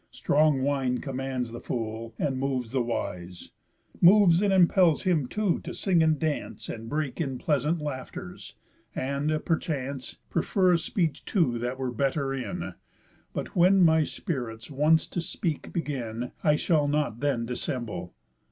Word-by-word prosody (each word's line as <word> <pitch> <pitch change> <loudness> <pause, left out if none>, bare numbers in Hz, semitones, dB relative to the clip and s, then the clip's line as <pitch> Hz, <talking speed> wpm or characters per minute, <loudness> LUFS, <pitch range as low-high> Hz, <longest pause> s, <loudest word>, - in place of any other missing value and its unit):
Strong 150 -2 +2
wine 135 -3 +1
commands 130 -3 -3
the 120 - -6
fool 115 -1 -4
and 135 -3 -1
moves 130 -4 -2
the 130 -1 +1
wise, 90 -6 -4 0.5
Moves 180 -1 +7
and 205 -1 +2
impels 180 -3 +4
him 165 -9 +1
too 210 +3 0
to - - -7
sing 180 -4 +2
and 160 -1 +3
dance, 155 0 -3
And 115 0 -6
break 150 -1 -2
in 135 -5 -2
pleasant 150 +4 0
laughters, 145 -4 -7 0.4
and, 140 +3 -1
perchance, 140 -5 -2
Prefer 180 +2 +2
a - - +5
speech 165 -3 -1
too 130 - +1
that 125 +2 -3
were 130 -1 -2
better 135 +3 0
in. 135 -2 -4 0.6
But - - -5
when 185 +2 +5
my 160 -1 +5
spirits 125 - -4
once 150 +3 +3
to 175 - -3
speak 165 -2 -3
begin, 125 -7 -3
I 150 -2 +4
shall 150 -2 +2
not 145 -6 0
then 140 -5 0
dissemble. 115 -7 -4
140 Hz, 150 wpm, -27 LUFS, 125-160 Hz, 0.6 s, Moves